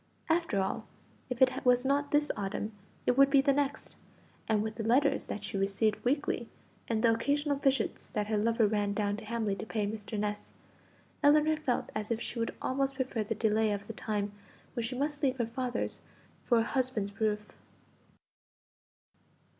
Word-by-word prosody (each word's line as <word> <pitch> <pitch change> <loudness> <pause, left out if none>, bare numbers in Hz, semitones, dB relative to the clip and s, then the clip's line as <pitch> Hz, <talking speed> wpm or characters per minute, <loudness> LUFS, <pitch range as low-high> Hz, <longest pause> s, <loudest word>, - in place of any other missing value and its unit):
After 325 - +2
all, 190 - -2 0.4
if 250 +1 +3
it 255 - +2
was 250 0 +4
not 285 +1 +2
this 295 0 +2
autumn 205 +1 -3 0.3
it 245 - +3
would 275 +1 +6
be 275 0 +5
the 275 +1 +4
next; 285 +1 -2 0.5
and 215 -2 +2
with 220 0 -3
the 220 0 -5
letters 270 +5 +2
that 205 - -5
she 195 -1 -2
received 200 +2 +1
weekly, 250 -3 0 0.4
and 220 -1 0
the 230 -1 +6
occasional 285 +4 +1
visits 270 -4 0
that 210 -1 -1
her 215 0 0
lover 230 +1 +3
ran 205 -1 +1
down 205 -1 0
to 215 - -9
Hamley 220 -3 -1
to - - -5
pay 215 -1 -1
Mr. 210 +1 -4
Ness, 210 0 -3 0.7
Ellinor 305 +1 +5
felt 305 -5 -1
as 215 -1 -3
if 230 -1 0
she 235 0 -4
would 230 - -2
almost 270 +1 0
prefer 255 -4 -1
the 220 +2 -3
delay 220 0 +2
of 200 0 -3
the 225 - -7
time 210 -2 -2 0.4
when 240 - -2
she 245 +3 -3
must 290 +1 -1
leave 265 -3 +1
her 240 - +1
father's 245 +2 -3 0.4
for 240 - +3
a 225 - +4
husband's 230 -5 -2
roof. 210 -1 -1
230 Hz, 180 wpm, -31 LUFS, 210-270 Hz, 0.7 s, would